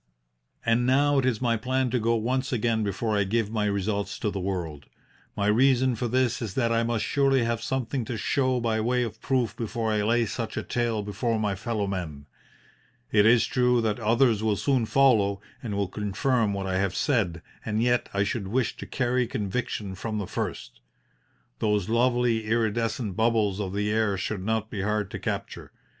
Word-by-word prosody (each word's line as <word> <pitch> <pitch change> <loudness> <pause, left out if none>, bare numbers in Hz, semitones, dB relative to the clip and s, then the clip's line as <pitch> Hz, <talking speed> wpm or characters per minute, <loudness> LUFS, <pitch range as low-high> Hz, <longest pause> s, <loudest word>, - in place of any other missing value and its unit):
"And 115 +1 +2
now 140 +2 +4
it 130 - +1
is 125 -1 0
my 115 -1 +2
plan 130 +2 0
to 125 - +1
go 115 +1 +2
once 130 +5 -1
again 115 -2 +1
before 105 +2 -1
I 100 - +3
give 110 +2 -1
my 110 -2 0
results 100 0 -1
to 105 - -1
the 100 - -4
world. 85 -7 -4 0.5
My 100 - 0
reason 130 +4 +4
for 120 +1 -2
this 125 0 +1
is 110 -5 -4
that 120 -3 +1
I 115 0 +2
must 115 -1 -1
surely 135 -3 +2
have 115 -1 -1
something 130 0 -2
to 115 - -4
show 130 +3 +1
by 115 -2 0
way 125 +2 +1
of 110 -2 -6
proof 130 -4 0
before 115 -1 -2
I 105 -1 +1
lay 115 +3 +2
such 115 +1 -4
a - - -1
tale 115 -3 -1
before 110 +3 -1
my 105 -2 0
fellow 105 +1 -2
men. 85 -7 -5 0.9
It 105 0 +5
is 120 0 +5
true 125 -1 +2
that 110 0 -1
others 115 0 +3
will 110 -2 +1
soon 125 +1 +1
follow 110 -8 +3 0.2
and 110 -5 -4
will 100 -1 0
confirm 105 +4 0
what 100 -1 -3
I 95 0 0
have 95 -1 0
said, 100 - 0 0.2
and 110 -1 -1
yet 120 0 +1
I 100 0 +1
should 105 -1 -2
wish 120 +3 0
to - - -8
carry 125 -1 0
conviction 105 -2 -3
from 110 +3 -4
the 100 - -2
first. - - -5 0.8
Those 105 -2 0
lovely 120 -1 +2
iridescent 110 -1 0
bubbles 110 -3 +1
of 95 -3 -3
the 105 +1 -1
air 110 -2 +1
should 95 0 -3
not 110 +1 -1
be 100 - -3
hard 105 0 -1
to - - -5
capture. - - -5
110 Hz, 195 wpm, -26 LUFS, 100-120 Hz, 0.9 s, It